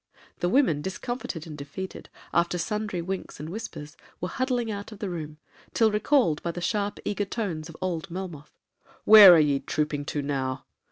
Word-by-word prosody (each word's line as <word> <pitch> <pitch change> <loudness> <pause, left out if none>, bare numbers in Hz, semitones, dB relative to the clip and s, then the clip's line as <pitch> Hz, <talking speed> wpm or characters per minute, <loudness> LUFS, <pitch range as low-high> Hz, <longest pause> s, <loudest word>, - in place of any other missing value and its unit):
The 175 - +1
women, 190 - +3
discomfited 190 -2 -5
and 155 -2 -8
defeated, 150 +7 -7 0.2
after 170 +1 +2
sundry 210 -1 -2
winks 190 -3 -5
and 155 +2 -6
whispers, 165 -7 -7 0.2
were 180 - -3
huddling 250 -3 -1
out 205 +1 -6
of 215 - -9
the 200 -3 -4
room, 155 -3 -6 0.4
till 225 -2 +4
recalled 210 - +2
by 170 - -3
the 170 - -4
sharp 205 +4 -1
eager 205 0 -1
tones 180 -7 -4
of 165 - -11
old 185 0 -3
Melmoth.—'Where 185 +3 +5
are - - +6
ye 145 -2 +3
trooping 150 -1 -2
to 145 -1 -3
now? 135 -2 -2
175 Hz, 170 wpm, -26 LUFS, 155-210 Hz, 0.4 s, are